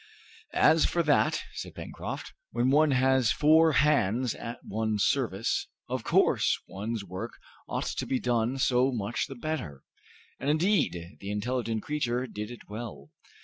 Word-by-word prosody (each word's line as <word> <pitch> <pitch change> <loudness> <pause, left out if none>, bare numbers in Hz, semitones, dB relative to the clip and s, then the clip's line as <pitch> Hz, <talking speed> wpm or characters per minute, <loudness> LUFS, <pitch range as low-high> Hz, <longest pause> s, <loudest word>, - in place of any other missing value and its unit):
"As 160 0 +5
for 170 - +1
that," 150 -2 +2
said - - -7
Pencroft, - - -6 0.2
"when 120 +2 +1
one 155 +2 +5
has 130 -3 +3
four 160 +1 +5
hands 130 -5 +2
at 115 +1 -6
one's 110 -1 -1
service, 115 -6 0 0.2
of - - -3
course - - +3
one's 105 +2 -4
work 95 0 -6 0.3
ought - - -2
to - - -3
be 130 - 0
done 120 +1 0
so 130 0 +3
much 120 -1 -2
the 135 - -8
better!" 120 - -4 0.6
And 140 - -1
indeed 150 - +1
the 100 - -7
intelligent 115 +1 -2
creature 125 -4 -1
did 105 -3 -6
it 120 - -11
well. 110 +2 -8
125 Hz, 145 wpm, -28 LUFS, 110-140 Hz, 0.6 s, As